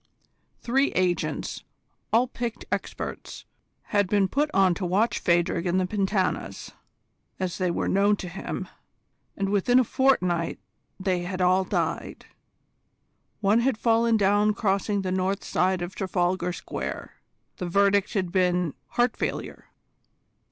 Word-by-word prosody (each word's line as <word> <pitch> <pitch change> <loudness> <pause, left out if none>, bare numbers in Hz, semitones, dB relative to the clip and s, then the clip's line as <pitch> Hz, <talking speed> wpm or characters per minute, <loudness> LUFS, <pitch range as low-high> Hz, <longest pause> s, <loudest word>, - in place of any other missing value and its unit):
Three 270 +4 +2
agents, 180 -2 -1 0.5
all 235 +3 +4
picked 235 -2 -5
experts, - - -5 0.5
had 205 -2 +3
been 200 -2 +3
put 290 +9 0
on 190 -6 +4
to 185 - -5
watch 195 +6 +1
Phadrig 170 0 +1
and 180 +2 +2
the 185 - +1
Pentanas, 195 0 -1 0.7
as 185 -1 -3
they 185 -1 +1
were 170 - -1
known 200 +2 +3
to 190 - -7
him, 175 +2 -5 0.7
and 195 0 -1
within 205 +5 +3
a - - +5
fortnight 185 -11 +1 0.4
they 190 -1 0
had 180 +1 -4
all 185 +1 +3
died. 185 - -3 1.2
One 210 +3 +4
had 255 -1 +1
fallen 230 0 +3
down 205 +1 +3
crossing 200 -1 0
the 185 - -2
north 190 +2 -1
side 185 0 +1
of 175 +2 -6
Trafalgar 180 -2 0
Square: - - -6 0.4
the 180 - -4
verdict 200 +3 +2
had 185 -4 0
been 180 -4 +1 0.2
heart 240 -1 +2
failure. - - -4
195 Hz, 135 wpm, -26 LUFS, 180-210 Hz, 1.2 s, a